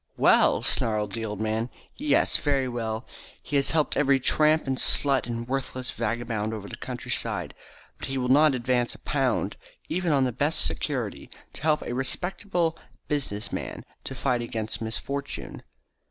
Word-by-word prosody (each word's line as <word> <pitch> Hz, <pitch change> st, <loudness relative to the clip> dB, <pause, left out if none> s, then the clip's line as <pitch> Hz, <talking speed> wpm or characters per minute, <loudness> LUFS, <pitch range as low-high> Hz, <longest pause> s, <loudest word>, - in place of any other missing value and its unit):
"Well!" -, -, +5 dB
snarled 105 Hz, -2 st, 0 dB
the 115 Hz, +3 st, -3 dB
old 105 Hz, -2 st, -4 dB
man. 110 Hz, +2 st, 0 dB, 0.3 s
"Yes, 295 Hz, +1 st, +3 dB
very 140 Hz, -3 st, +1 dB
well! 115 Hz, -1 st, -3 dB, 0.4 s
He 145 Hz, -, -4 dB
has 140 Hz, -, +2 dB
helped 155 Hz, -2 st, +1 dB
every 140 Hz, -2 st, +4 dB
tramp 155 Hz, +4 st, +4 dB
and 135 Hz, -1 st, -1 dB
slut 135 Hz, -4 st, +3 dB
and 115 Hz, 0 st, -4 dB
worthless 130 Hz, -1 st, -3 dB
vagabond 115 Hz, -1 st, -2 dB
over 100 Hz, -2 st, -7 dB
the -, -, -5 dB
countryside, -, -, -2 dB, 0.5 s
but -, -, -4 dB
he 135 Hz, 0 st, -2 dB
will 125 Hz, -1 st, 0 dB
not 145 Hz, +2 st, +6 dB
advance 125 Hz, 0 st, +1 dB
a -, -, -11 dB
pound, -, -, 0 dB, 0.3 s
even 175 Hz, 0 st, 0 dB
on 140 Hz, -2 st, +4 dB
the 130 Hz, -, +1 dB
best 145 Hz, -, +2 dB
security, 80 Hz, +1 st, -3 dB, 0.2 s
to -, -, -10 dB
help 150 Hz, 0 st, +2 dB
a -, -, -4 dB
respectable 170 Hz, +5 st, -1 dB, 0.3 s
business 130 Hz, -8 st, -1 dB
man -, -, -4 dB, 0.2 s
to -, -, -4 dB
fight 120 Hz, -1 st, +1 dB
against 115 Hz, -2 st, -3 dB
misfortune." 140 Hz, +5 st, -4 dB
130 Hz, 160 wpm, -27 LUFS, 115-145 Hz, 0.5 s, not